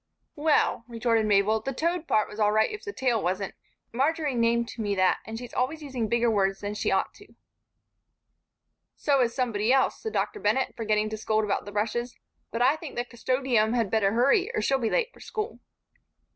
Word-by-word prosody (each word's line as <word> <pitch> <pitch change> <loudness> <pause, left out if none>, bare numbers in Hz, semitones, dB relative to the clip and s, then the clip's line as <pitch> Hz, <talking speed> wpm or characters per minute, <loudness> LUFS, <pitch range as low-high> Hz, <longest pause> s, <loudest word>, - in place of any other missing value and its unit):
"Well," 295 -5 +2
retorted 230 -2 +1
Mabel, 210 +2 +3
"the 270 - -4
toad 335 +3 -1
part 215 - +2
was 210 - -10
all 210 -1 +3
right 220 +1 +2
if 425 - -7
the 420 - -5
tail 250 - 0
wasn't. 185 +2 -2 0.4
Marjory 295 +3 0
named 235 0 +1
me 205 -2 -1
that, 185 -1 +3
and 225 0 -5
she's 245 0 -9
always 300 +5 -1
using 255 -6 -3
bigger 235 +1 +2
words 195 -2 +1
than 205 0 -3
she 210 - -1
ought - - 0
to." - - -18 1.6
"So 280 -3 +2
is 235 -1 0
somebody 230 -3 0
else," 265 0 +2
said 440 - -4
Dr. 420 - -1
Bennett, 265 -8 0
forgetting 215 -1 0
to 220 - -3
scold 215 0 0
about 205 -1 -1
the 205 - -8
brushes. 230 +4 -2 0.3
"But 230 +1 -1
I 275 +5 +4
think 315 -3 -9
the 240 - -2
'Custodium' 245 -2 0
had 230 -5 0
better 205 -2 +2
hurry, 275 - +3
or - - +1
she'll 270 0 +2
be 230 -3 0
late - - 0
for - - -18
school." 430 +2 -5
235 Hz, 200 wpm, -27 LUFS, 215-270 Hz, 1.6 s, I